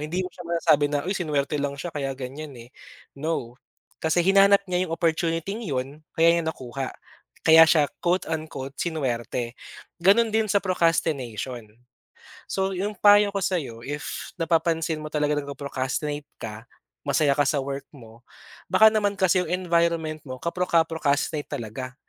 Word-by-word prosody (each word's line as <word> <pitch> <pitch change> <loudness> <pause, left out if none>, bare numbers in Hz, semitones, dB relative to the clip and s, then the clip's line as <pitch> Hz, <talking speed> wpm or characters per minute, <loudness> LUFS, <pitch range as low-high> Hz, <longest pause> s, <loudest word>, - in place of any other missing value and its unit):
Hindi 175 +5 -2
mo - - -4
siya 175 - -11
masasabi 165 -3 +3
na, 145 -1 -1
"Uy, 190 - -1
sinuwerte 150 -5 -1
lang 140 0 -2
siya 170 +4 -6
kaya 135 -2 -2
ganiyan, 140 +3 -7
eh". 120 +1 -12 0.5
No, 155 -6 -2 0.5
kasi 160 +2 +2
hinanap 195 +1 +6
niya 180 0 0
yung 165 - -1
opportuniting 165 +4 -1
'yon, 135 0 -3
kaya 165 +1 +5
niya - - -1
nakuha, 135 -3 -4 0.6
kaya 160 0 +9
siya, 155 -2 +4 0.2
quote, 180 +1 +1
unquote 155 -4 -5
sinuwerte. 125 -6 -2 0.5
Gano'n 215 +5 +5
din 220 0 +1
sa 200 - +4
procrastination. 135 - -1 0.8
So, 190 0 0
yung 205 +3 -2
payo 205 0 +6
ko 200 - 0
sa'yo, 135 -12 -2
if, 145 +1 -5
napapansin 165 -1 +1
mo 155 - -5
talaga 150 -1 +1
na, - - -2
nag-pro-procrastinate 140 +1 -4
ka, 110 +1 -8 0.4
masaya 140 0 +3
ka 145 - +3
sa 145 - +1
work 140 0 -5
mo, 115 -3 -15 0.5
baka 220 +4 +7
naman 205 -2 +1
kasi 185 -1 +3
yung - - -6
environment 170 -3 0
mo, 130 -1 -6
ka-procra-procrastinate 160 -4 0
talaga. 125 +3 -6
155 Hz, 150 wpm, -25 LUFS, 140-175 Hz, 0.8 s, kaya